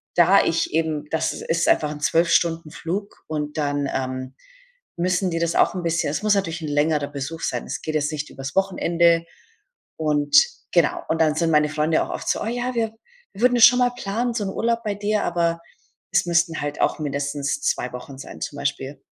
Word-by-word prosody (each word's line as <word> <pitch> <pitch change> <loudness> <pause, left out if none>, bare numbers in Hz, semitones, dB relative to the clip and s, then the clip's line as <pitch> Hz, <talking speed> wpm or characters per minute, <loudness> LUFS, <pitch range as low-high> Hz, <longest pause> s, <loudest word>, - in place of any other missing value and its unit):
da 180 +3 +6
ich 165 - 0
eben 160 -2 0
das 160 - 0
ist 165 0 -1
einfach 150 -1 +3
'n 150 - -7
12 165 +3 +2
Stunden 165 -2 +1
Flug 190 +5 -5
und 150 -1 -4
dann, 145 -1 0
ähm, 130 0 -3 0.7
müssen 180 +2 +1
die 165 - -2
das 170 0 0
auch - - +3
'n 180 - -3
bisschen 165 -2 0
es 150 - -3
muss 215 -1 +4
natürlich 175 -4 -2
'n - - -3
längerer 145 0 +1
Besuch 145 +3 -6
sein. - - -2
Es - - -5
geht 155 - -4
jetzt 150 0 0
nicht 150 -1 -4
übers 135 +1 -7
Wochenende 170 -3 +2 0.7
und 150 - 0 0.4
genau. - - +2
Und 160 0 +1
dann 155 -2 +3
sind 165 +1 +1
meine 150 -1 +3
Freunde 155 +1 +1
auch - - -7
oft - - -6
so: - - 0
„Oh, - - -2
ja, 245 +2 -2
wir 225 -2 -1 0.4
wir 200 - -10
würden 245 0 +4
es 230 - +9
schon 245 +1 +6
mal 245 -1 +3
planen, 240 +1 -2
so 225 -3 -2
'n - - -2
Urlaub 230 +3 0
bei 210 -2 -2
dir“, 210 +1 0
aber 170 -1 0 0.5
es - - +2
müssten 170 -1 +1
halt 145 0 -4
auch - - +2
mindestens 145 - -2
2 125 - -1
Wochen 130 +2 -8
sein 135 - -10
zum 145 - -5
Beispiel. 140 -1 -3
165 Hz, 210 wpm, -23 LUFS, 150-190 Hz, 0.7 s, es